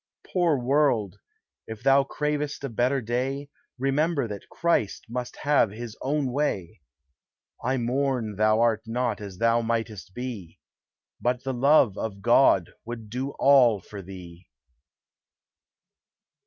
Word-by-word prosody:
Poor 175 -5 +3
world! 125 -6 +1 0.5
if 110 0 -8
thou 135 +1 +5
cravest 150 +1 -3
a 140 - -2
better 125 +4 +1
day, 130 +5 -2 0.3
Remember 140 +1 +1
that 105 -2 -8
Christ 170 -12 0
must 125 +1 -5
have 145 -6 +3
his 110 +2 -8
own 140 -1 0
way; 110 - -2 0.8
I 130 +2 +1
mourn 125 -3 -1
thou 110 +2 +3
art 115 -2 +2
not 115 -2 -1
as 100 -3 -8
thou 115 +3 +3
mightest 115 -4 -3
be, 115 -9 -6 0.6
But 125 0 0
the 135 0 -2
love 130 -4 +4
of 100 -3 -5
God 120 -6 +4
would 115 -2 -8
do 130 +4 -3
all 130 -6 +5
for 100 +2 -10
thee. 90 -2 -11
120 Hz, 130 wpm, -26 LUFS, 110-135 Hz, 0.8 s, thou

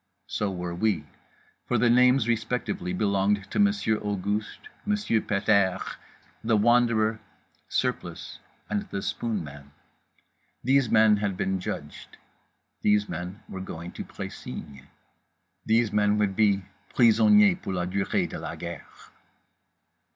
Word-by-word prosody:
So 105 - -2
were 90 -2 -4
we: 95 -4 0 0.6
for - - +1
the 120 - +3
names 125 0 +5
respectively 115 -4 -1
belonged 100 +1 0
to - - -1
Monsieur 200 - +2
Auguste, 105 - -3 0.2
Monsieur 210 - +1
Pet 100 0 -2
airs, 100 -4 +2 0.5
The 110 -1 +3
Wanderer, 115 -1 +3 0.5
Surplice - - -3 0.3
and 105 -1 -3
The 100 - -4
Spoonman. 75 -11 -4 0.9
These 135 0 +3
men 110 -1 +5
had 100 -2 -2
been 95 0 -1
judged. 90 - -7 0.6
These 105 0 +3
men 90 +5 -6
were 95 - -7
going 85 -2 -7
to - - -6
Précigne. 70 -2 -8 0.8
These 110 -1 +3
men 105 0 +2
would 100 -2 +1
be 100 -3 +3 0.3
prisonniers 195 - +5
pour 95 - -4
la 90 -1 -1
durée 95 +2 0
de - - -7
la - - -5
guerre. 85 0 -7
105 Hz, 125 wpm, -26 LUFS, 95-115 Hz, 0.9 s, names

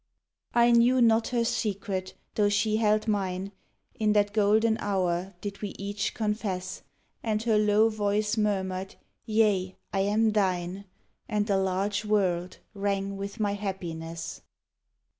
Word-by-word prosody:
I 240 0 +5
knew 240 +2 +5
not 225 -1 +4
her 240 -2 0
secret, 200 -5 -2 0.2
though 205 -1 +2
she 210 +1 +2
held 215 0 +2
mine: 195 -2 -1 0.4
In 215 -4 +1
that 205 0 +2
golden 220 +1 +3
hour 185 -2 -1
did 200 -1 -6
we 205 -2 -5
each 200 +1 -3
confess; 210 -4 -2 0.4
And 215 -1 -1
her 220 -2 +3
low 210 +1 +4
voice 210 0 0
murmured, 190 -3 -1 0.3
Yea, 210 -4 +2 0.2
I 195 - +1
am 215 +3 +2
thine, 190 -2 -1 0.4
And 210 -2 +1
the 200 -2 +1
large 195 +2 0
world 185 -4 0 0.2
rang 200 -1 -1
with 200 +3 -6
my 205 -2 +1
happiness. 170 -5 -5
205 Hz, 135 wpm, -28 LUFS, 190-215 Hz, 0.4 s, I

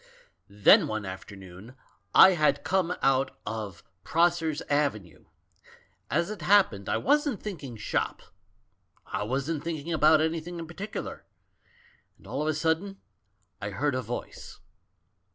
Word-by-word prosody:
"Then 100 0 +5
one 110 -1 -3
afternoon 95 +3 -10 0.4
I 190 - +9
had 155 -4 +1
come 180 -2 0
out 135 0 +2
of 105 -5 -6 0.2
Pross 170 +1 +2
ers' 155 -2 -2
Avenue. 125 - -2 0.8
As 170 +7 0
it 215 - -7
happened 180 - +3
I - - +1
wasn't 290 - +1
thinking 145 - -6
shop; 105 - -2 0.8
I - - -4
wasn't 140 +7 -2
thinking 165 -1 -4
about 155 0 +5
anything 165 +2 -2
in 165 - -6
par 165 - -12
ticular; - - -6 1.0
and - - -22
all - - -4
of 150 - -1
a 155 - +1
sudden 165 +6 -1 0.6
I 100 - -3
heard 140 +8 -1
a 130 - -1
voice. 120 +1 -7
150 Hz, 135 wpm, -27 LUFS, 110-170 Hz, 1.0 s, I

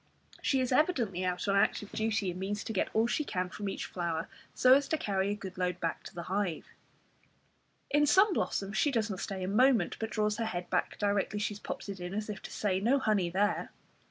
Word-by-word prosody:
She 265 -2 +2
is 255 - -1
evidently 250 - +2
out 180 +1 -1
on 200 - +2
active 200 +1 +1
duty, 220 -3 0
and 180 - -7
means 205 +2 -2
to 225 - -4
get 190 - 0
all 220 +1 +4
she 240 +6 0
can 185 -9 -2
from 205 +1 -4
each - - -4
flower, 170 -2 -3 0.2
so 255 0 +6
as 280 +1 +4
to 315 - 0
carry 195 -6 0
a 205 - 0
good 190 -2 -8
load 180 0 0
back 165 - -2
to - - -10
the 170 - -4
hive. 190 -3 -2 1.3
In 295 0 +4
some 385 +6 +5
blossoms 200 - -1
she 295 - +3
does 225 -5 0
not 190 - -4
stay 190 -2 -4
a - - -2
moment, 245 +5 +3
but 220 - -2
draws 210 0 0
her 230 - -1
head 180 -5 -4
back 180 - 0
directly 205 0 0
she 210 0 -1
has 205 - -10
popped - - -6
it 195 -1 -6
in, 180 +2 -5
as 215 0 -2
if 200 - -8
to - - -9
say 190 -3 0
"No 240 +8 +3
honey 210 -9 +1
there." 205 +4 0
205 Hz, 235 wpm, -31 LUFS, 185-225 Hz, 1.3 s, so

